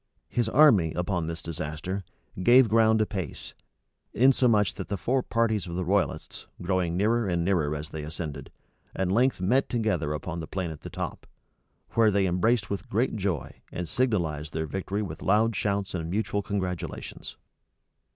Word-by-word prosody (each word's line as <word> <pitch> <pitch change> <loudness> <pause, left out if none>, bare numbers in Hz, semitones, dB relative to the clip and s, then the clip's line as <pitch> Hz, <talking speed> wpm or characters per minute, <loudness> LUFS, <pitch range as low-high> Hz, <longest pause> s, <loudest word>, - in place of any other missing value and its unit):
His 120 -2 0
army, 110 - +5
upon 90 -2 -1
this 85 0 -5
disaster, 85 +4 -4 0.4
gave 120 +5 +7
ground 110 0 +4
apace; 95 -7 -4 0.6
insomuch 120 -5 +4
that - - -6
the 100 - -2
four 130 +8 +1
parties 110 -6 0
of 85 - -5
the 90 0 -2
royalists, 100 +2 -1
growing 90 -1 0
nearer 110 +3 +2
and 85 -2 0
nearer 80 -6 +1
as 75 +1 -6
they 80 - -6
ascended, 75 -2 -6 0.4
at 95 -1 0
length 125 0 +2
met 125 +9 +2
together 110 -10 0
upon 85 +3 -4
the 80 - -6
plain 95 -4 -3
at 75 - -9
the - - -7
top; - - -5 0.6
where 115 -1 +4
they 100 -1 +2
embraced 105 +6 +2
with 100 - -5
great 115 +5 +1
joy, 95 -6 -3
and 90 -1 -4
signalized 80 - -1
their 80 0 -1
victory 95 +5 -3
with 100 - -7
loud 110 +3 +3
shouts 100 0 -1
and 80 -2 -3
mutual 100 +1 -1
congratulations. 95 -3 -4
95 Hz, 160 wpm, -27 LUFS, 85-110 Hz, 0.6 s, gave